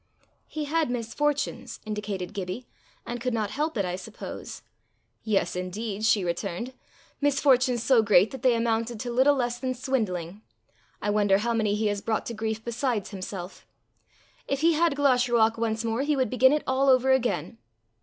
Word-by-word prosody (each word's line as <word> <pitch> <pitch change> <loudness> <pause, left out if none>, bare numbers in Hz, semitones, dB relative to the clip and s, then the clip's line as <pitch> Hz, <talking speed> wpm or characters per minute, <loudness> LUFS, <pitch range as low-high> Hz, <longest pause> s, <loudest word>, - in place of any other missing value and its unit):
"He 305 -1 -4
had 315 0 0
misfortunes," 250 +5 -2
indicated 210 -3 -4
Gibbie, 195 +5 -5 0.4
"and 240 0 -5
could 250 -1 -1
not 210 -2 -1
help 300 +1 -2
it, 200 - +1
I 180 0 -2
suppose." 205 +4 -8 0.6
"Yes 210 -4 0
indeed!" 200 +4 -3
she 210 -3 +3
returned, 180 +7 -3 0.2
" - - -31
misfortunes 260 -4 +3
so 250 -2 +5
great 210 -1 +4
that 265 - -8
they 250 -2 +4
amounted 230 0 -1
to 245 - -4
little 265 +4 +4
less 245 -2 -1
than 255 0 -2
swindling. 210 -8 -2 0.6
I 205 - +1
wonder 205 -2 +3
how 235 +3 -1
many 215 -3 +1
he 215 +1 -1
has 205 -1 0
brought 220 0 -1
to 235 - -4
grief 220 0 -3
besides 235 -4 -2
himself! 185 -1 -7 0.8
If 275 0 -1
he 335 +1 +5
had 325 -1 +2
Glashruach 245 -5 +3
once 225 0 -1
more 225 +2 0
he 295 +1 +1
would 260 -5 0
begin 260 +1 +5
it 300 0 +1
all 265 +1 +2
over 260 0 +4
again." 245 -2 0
230 Hz, 175 wpm, -26 LUFS, 210-260 Hz, 0.8 s, so